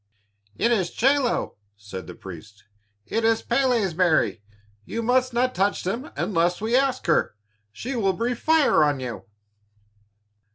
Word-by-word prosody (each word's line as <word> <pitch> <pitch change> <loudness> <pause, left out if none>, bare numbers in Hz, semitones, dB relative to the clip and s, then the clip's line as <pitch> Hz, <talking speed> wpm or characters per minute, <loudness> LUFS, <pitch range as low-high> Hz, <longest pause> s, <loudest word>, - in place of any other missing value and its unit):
"It 235 - +1
is 190 -7 +1
chelo," 265 - +1 0.2
said 100 -2 -9
the 90 - -9
priests, 95 +3 -11 0.4
"it 225 - -2
is 225 0 +2
Pélé's 245 -9 +1
berry. 160 - +2 0.4
You 230 - -4
must 255 +2 +2
not 250 +2 +1
touch 200 -1 0
them 230 +10 -3
unless 175 -2 +1
we 225 +3 0
ask 265 -1 +1
her. 160 -10 +1 0.4
She 245 - -5
will 195 -5 +1
breathe 235 +4 -2
fire 315 - +4
on 145 -2 +1
you." 120 -7 -6
220 Hz, 140 wpm, -24 LUFS, 155-250 Hz, 0.4 s, fire